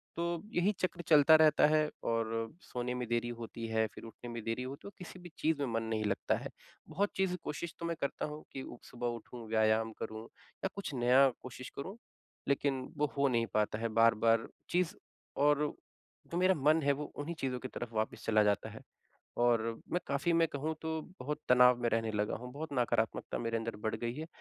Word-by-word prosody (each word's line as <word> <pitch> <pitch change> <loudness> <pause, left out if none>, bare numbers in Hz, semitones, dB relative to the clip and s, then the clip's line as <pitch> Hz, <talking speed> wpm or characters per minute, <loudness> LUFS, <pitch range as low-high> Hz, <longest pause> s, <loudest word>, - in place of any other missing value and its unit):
तो 170 0 -1
यही 175 +4 +3
चक्र 180 -1 -1
चलता 155 0 +8
रहता 155 -1 +6
है 155 0 +3
और 115 -1 0 0.3
सोने 125 0 -3
में 125 -1 -3
देरी 120 0 0
होती 115 0 -6
है, 110 0 +2
फ़िर 110 - -12
उठने 120 +2 -9
में 115 -2 -5
देरी 115 +2 -2
हो 130 +2 -5
तो - - -8
किसी 185 0 -9
भी 175 0 -10
चीज़ 160 -1 +1
में 140 - +1
मन 115 - 0
नहीं 110 -1 -1
लगता 100 -1 +1
है। - - -6 0.4
बहुत 195 +6 +1
चीज़ 190 -2 +1
कोशिश 165 +2 -4
तो 170 - -4
मैं 170 - -1
करता 140 - -1
हूँ 150 0 -7
कि 135 - -5 0.2
सुबह 120 0 -4
उठूँ, 120 0 -6
व्यायाम 110 0 +3
करूँ 110 0 -5 0.4
या 190 - +1
कुछ 195 -7 -4
नया 125 +2 +6
कोशिश 130 0 -8
करूँ 190 +10 -5 0.5
लेकिन 140 -1 +1 0.2
वो 150 - +3
हो 140 - +4
नहीं 120 -3 +2
पाता 105 0 +1
है 115 - 0
बार-बार 115 0 +4 0.2
चीज़ 180 +2 +1 0.5
और 145 0 +5 0.7
जो 170 - -1
मेरा 185 +1 +4
मन 155 +3 +4
है 140 - +4
वो 150 +2 -4
उन्हीं 160 +4 -4
चीज़ों 130 -2 -1
की 130 - -5
तरफ 120 -2 -6
वापस 110 0 -2
चला 110 -1 +4
जाता 105 -1 +1
है। - - -10 0.6
और 120 -2 +4 0.3
मैं 175 - +2
काफ़ी 140 +5 +1
मैं 165 0 +4
कहूँ 155 +3 -2
तो 160 0 -2 0.2
बहुत 150 +4 -3
तनाव 125 0 +7
में 120 - +3
रहने 115 -1 0
लगा 105 0 0
हूँ, 125 +2 -8
बहुत 155 +3 -5
नकारात्मकता 120 -3 0
मेरे 115 -1 -1
अंदर 115 0 -4
बढ़ - - 0
गई 120 0 -3
है। 155 +3 -5
125 Hz, 205 wpm, -33 LUFS, 115-155 Hz, 0.7 s, चलता